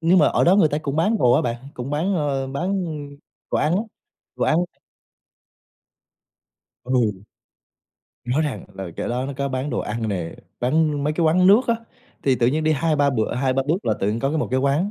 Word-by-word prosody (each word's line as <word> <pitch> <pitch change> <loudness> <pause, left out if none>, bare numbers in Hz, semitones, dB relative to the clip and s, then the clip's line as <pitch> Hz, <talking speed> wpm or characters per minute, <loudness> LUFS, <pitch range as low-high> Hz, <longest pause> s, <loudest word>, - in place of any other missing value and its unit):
nhưng 170 +3 +4
mà 150 - +5
ở - - +2
đó 185 +3 +5
người 160 -7 +5
ta 150 - -1
cũng 145 -1 -4
bán 205 +7 +2
đồ 120 - +4
á - - +3
bạn, 120 -1 -1 0.2
cũng 125 +3 -5
bán, 170 +7 0
ơ, 140 -3 -1
bán 180 +7 -2 0.7
đồ - - +1
ăn 165 +4 +2
á, 210 - 0 0.5
đồ - - 0
ăn. 155 - +3 2.3
Ừ. 115 -7 0 1.0
Nói 130 +6 +1
rằng 150 -3 -3
là 95 -2 -6
chỗ - - -3
đó 125 +2 -2
nó 140 - -4
có 140 0 -1
bán 130 +2 -3
đồ - - -2
ăn 110 +1 -3
nè, 90 -5 -3 0.3
bán 145 +2 +1
mấy 150 - +1
cái 165 +1 0
quán 180 +4 +4
nước 205 +5 +7
á, 230 - +4 0.5
thì 135 -2 +3
tự 120 - +2
nhiên 155 +5 +1
đi 155 - +3
2-3 150 -2 +2
bữa 110 -2 -1
2-3 130 +1 +1
bước 180 +6 0
là - - +1
tự 100 - +1
nhiên 115 +2 -2
có 135 - +1
cái 160 - -1
một - - -1
cái 130 +1 +1
quán, 145 +9 +1
140 Hz, 215 wpm, -22 LUFS, 125-160 Hz, 2.3 s, nước